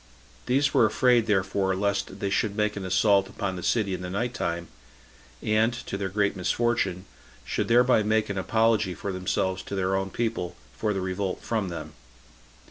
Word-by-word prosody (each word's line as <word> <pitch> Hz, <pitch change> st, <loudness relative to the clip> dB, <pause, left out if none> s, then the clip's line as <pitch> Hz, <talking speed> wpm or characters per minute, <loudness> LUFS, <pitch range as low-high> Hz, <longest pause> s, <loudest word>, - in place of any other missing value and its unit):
These 135 Hz, +2 st, +2 dB
were 110 Hz, -, +5 dB
afraid, 115 Hz, +1 st, +3 dB
therefore, 95 Hz, -1 st, +1 dB
lest 100 Hz, 0 st, -2 dB
they 100 Hz, -, -1 dB
should 100 Hz, 0 st, 0 dB
make 105 Hz, 0 st, 0 dB
an 100 Hz, -, -5 dB
assault 95 Hz, +1 st, +3 dB
upon 100 Hz, -1 st, -3 dB
the 90 Hz, -, -6 dB
city 100 Hz, +2 st, +1 dB
in 90 Hz, -, -4 dB
the 90 Hz, -, -5 dB
night 115 Hz, +6 st, -2 dB
time, 85 Hz, -4 st, -2 dB, 0.8 s
and, 110 Hz, +2 st, +3 dB
to -, -, -4 dB
their 95 Hz, -1 st, -2 dB
great 100 Hz, +1 st, +1 dB
misfortune, 95 Hz, -1 st, 0 dB, 0.4 s
should -, -, -1 dB
thereby 125 Hz, 0 st, +5 dB
make 110 Hz, +1 st, +1 dB
an 100 Hz, -, -4 dB
apology 110 Hz, -2 st, +2 dB
for 100 Hz, -, -4 dB
themselves 95 Hz, 0 st, -1 dB
to -, -, -6 dB
their 95 Hz, 0 st, 0 dB
own 95 Hz, 0 st, -1 dB
people 110 Hz, -5 st, -2 dB, 0.2 s
for 105 Hz, -, -1 dB
their 95 Hz, -2 st, -2 dB
revolt 95 Hz, 0 st, -3 dB
from 110 Hz, -5 st, -1 dB
them. 80 Hz, -3 st, -7 dB
100 Hz, 180 wpm, -26 LUFS, 95-110 Hz, 0.8 s, were